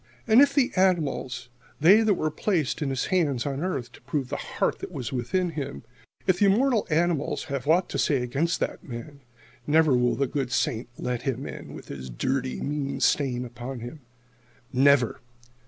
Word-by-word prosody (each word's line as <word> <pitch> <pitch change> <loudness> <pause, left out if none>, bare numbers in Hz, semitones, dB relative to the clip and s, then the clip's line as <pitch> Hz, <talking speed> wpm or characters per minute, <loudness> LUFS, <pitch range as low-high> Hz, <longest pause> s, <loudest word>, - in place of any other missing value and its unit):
"And 230 +3 +6
if 280 -1 +4
the 275 -4 +3
animals 155 -9 0 0.3
they 190 +9 +7
that 215 -3 +3
were 155 -2 -1
placed 160 -3 -1
in 145 - 0
his 135 -1 -1
hands 145 -9 +1
on 140 -1 -2
earth 130 -10 -3
to - - -16
prove 135 -4 -3
the - - -2
heart - - -2
that - - -7
was 120 -4 -5 0.2
in 180 -2 +1
him 140 -4 -5 0.4
if 185 -1 +2
the 205 - +5
immortal 230 +3 +3
animals 165 -1 +1
have 140 0 -3
aught 175 +4 +4
to - - -3
say 135 -4 +2
against 145 +7 0
that - - -2
man 140 0 -8 0.5
never 155 -2 +4
will 125 0 +2
the 140 - +1
good 135 -1 -3
Saint 120 -2 0
let 125 -1 -2
him 135 0 -2
in, - - -8
with - - -11
his 65 -2 -7
dirty, 130 - -2
mean 140 -1 -2
stain 125 -3 +1
upon 120 +1 -7
him. 120 +6 -8 0.7
Never. 130 -2 +4
140 Hz, 185 wpm, -26 LUFS, 125-175 Hz, 0.7 s, they